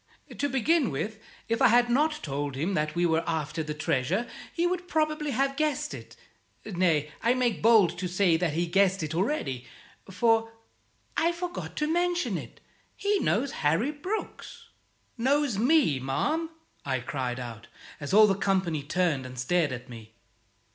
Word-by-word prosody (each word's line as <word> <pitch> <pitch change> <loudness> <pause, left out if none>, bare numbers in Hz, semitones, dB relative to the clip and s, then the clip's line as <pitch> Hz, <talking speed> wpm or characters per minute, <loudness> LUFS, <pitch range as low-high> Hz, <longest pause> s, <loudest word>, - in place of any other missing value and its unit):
To 285 - -1
begin 280 - +2
with, 200 +9 -4 0.3
if 230 0 -1
I - - +7
had 240 +1 +4
not 300 +5 +1
told 145 -1 -3
him 165 +9 -1
that 150 -2 -1
we 175 +1 +2
were 165 -1 +2
after 160 -1 -2
the 150 -1 -4
treasure, 155 - 0 0.2
he 340 - 0
would 360 0 -1
probably 305 -2 0
have 275 +1 0
guessed 305 0 -1
it; - - -10 0.5
nay, 170 -7 +1
I 235 +2 +3
make 245 -4 0
bold 205 -7 +5
to 185 - -2
say 180 -1 +2
that 165 -2 0
he 170 +3 0
guessed 195 +1 +2
it 155 +1 -3
already, 160 - -1 0.4
for 225 +3 +2 0.6
I 335 +1 +2
forgot 350 +1 -5
to 300 - 0
mention 350 +2 0
it - - -8 0.3
he 405 0 +1
knows 270 -1 +1
Harry 165 - +1
Brooks." 365 +9 -6 0.5
"Knows 270 -3 +1
me, 250 - +3
ma'am?" 300 - -1 0.3
I 130 -2 -1
cried 125 0 -3
out, 115 -2 -8 0.3
as 145 - -5
all 215 +2 +8
the 200 - +3
company 190 -6 0
turned 160 -2 0
and 130 0 -10
stared 155 +4 +1
at 125 -1 -6
me. 110 -2 -12
195 Hz, 165 wpm, -28 LUFS, -, 0.6 s, all